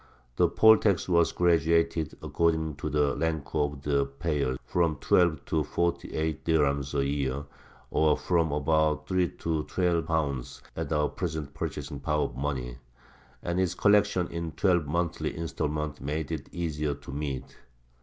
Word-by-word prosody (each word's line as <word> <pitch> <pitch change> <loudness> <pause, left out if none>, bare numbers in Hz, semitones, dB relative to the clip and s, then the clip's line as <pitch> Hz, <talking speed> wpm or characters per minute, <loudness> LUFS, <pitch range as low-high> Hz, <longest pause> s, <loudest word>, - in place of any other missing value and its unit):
The - - +5
poll 110 0 +7
tax 100 -5 +1
was 85 -2 +3
graduated 85 -2 +2
according 80 -3 0
to 75 - -3
the 75 -1 +1
rank 80 -3 -2
of 75 -2 -1
the 70 -1 +1
payer, 70 -2 -1
from 85 -3 +1
twelve 80 -1 +2
to 80 -2 0
forty 85 +3 -2
eight 80 -1 -2
dirhems 70 -3 +1
a 70 - +1
year, 70 0 -1 0.5
or 75 -1 +3
from 85 -3 +1
about 75 +1 +1
three 90 -2 +1
to 80 -2 -2
twelve 85 -3 0
pounds 70 -6 -2
at - - -4
our 75 -1 +2
present 80 -7 -4
purchasing 70 - -5
power 75 +1 0
of - - -4
money; 65 -3 -3 0.6
and 85 +1 -1
its 95 -1 +1
collection 100 -3 +3
in 85 -1 -4
twelve 90 -6 +2
monthly 85 +3 -2
instalments 75 -3 -3
made 75 +3 -3
it 75 -4 -3
the - - -10
easier 75 -3 -1
to 70 -1 -11
meet. 70 -2 -5
80 Hz, 155 wpm, -28 LUFS, 70-85 Hz, 0.6 s, poll